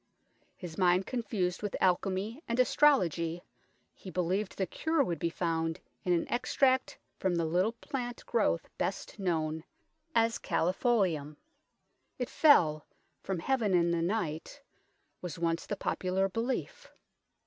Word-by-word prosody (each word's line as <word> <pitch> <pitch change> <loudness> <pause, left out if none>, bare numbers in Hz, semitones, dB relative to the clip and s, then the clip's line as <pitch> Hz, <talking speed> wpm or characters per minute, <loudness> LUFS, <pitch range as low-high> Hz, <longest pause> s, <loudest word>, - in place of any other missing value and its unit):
His 175 -2 -8
mind 180 +1 +4
con 250 -2 -2
fused 185 -5 -2
with 205 -2 -3
alchemy 190 - 0
and 235 +1 -1
astrology, 175 - +3 0.5
he 190 - -11
believed 185 +3 -1
the 190 - +1
cure 315 - +1
would 175 -9 -3
be 170 - 0
found 165 -1 -1 0.2
in 180 - 0
an 170 -1 +2
extract 260 +1 +1 0.2
from 185 -2 +1
the 170 -1 +1
little 180 +7 +1
plant 245 0 -5
growth 210 -7 +1
best 195 +2 -3
known 160 -4 -1 0.5
as 230 0 +3
Ccelifolium. 180 - +1 0.8
It 250 - -3
fell 160 - +5 0.3
from 190 - -3
heaven 220 0 +1
in 170 -1 +3
the 170 -1 +1
night 175 - -2 0.6
was 175 -4 -5
once 165 0 -1
the 205 - -3
popular 190 +1 0
belief. 230 +6 -3
185 Hz, 135 wpm, -31 LUFS, 170-230 Hz, 0.8 s, fell